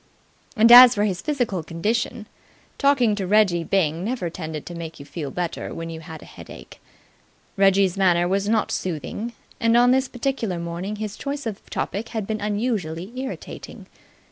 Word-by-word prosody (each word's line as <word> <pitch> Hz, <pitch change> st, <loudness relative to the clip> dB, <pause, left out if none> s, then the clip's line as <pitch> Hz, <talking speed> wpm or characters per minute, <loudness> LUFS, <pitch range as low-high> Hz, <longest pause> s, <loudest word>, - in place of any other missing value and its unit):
And 225 Hz, +2 st, +6 dB
as 245 Hz, 0 st, +11 dB
for 205 Hz, -, +1 dB
his 190 Hz, -4 st, -1 dB
physical 245 Hz, -, -1 dB
condition, 210 Hz, +7 st, -2 dB, 0.5 s
talking 275 Hz, -6 st, +3 dB
to 200 Hz, -3 st, -3 dB
Reggie 195 Hz, -4 st, +3 dB
Byng 165 Hz, -3 st, 0 dB
never 210 Hz, -6 st, -3 dB
tended 155 Hz, -3 st, -6 dB
to 175 Hz, -, -8 dB
make 165 Hz, -2 st, -7 dB
you 140 Hz, -, -10 dB
feel 150 Hz, -2 st, -6 dB
better 175 Hz, +4 st, -4 dB
when 165 Hz, 0 st, -6 dB
you 160 Hz, -, -7 dB
had 160 Hz, -1 st, -10 dB
a -, -, -13 dB
headache. 60 Hz, -, -13 dB, 0.7 s
Reggie's 195 Hz, -1 st, +3 dB
manner 175 Hz, -2 st, +3 dB
was 195 Hz, +2 st, 0 dB
not 220 Hz, -1 st, +1 dB
soothing, 185 Hz, -, -4 dB, 0.3 s
and 230 Hz, +1 st, +3 dB
on 245 Hz, +1 st, +5 dB
this 265 Hz, 0 st, +2 dB
particular 245 Hz, -7 st, -2 dB
morning 170 Hz, +4 st, -4 dB
his 210 Hz, -1 st, -5 dB
choice 280 Hz, -1 st, -5 dB
of 215 Hz, -3 st, -5 dB
a -, -, -19 dB
topic 220 Hz, +3 st, -3 dB
had 220 Hz, -3 st, -3 dB
been 215 Hz, +1 st, -3 dB
unusually 205 Hz, -4 st, -2 dB
irritating. 260 Hz, +1 st, -7 dB
200 Hz, 170 wpm, -23 LUFS, 170-230 Hz, 0.7 s, as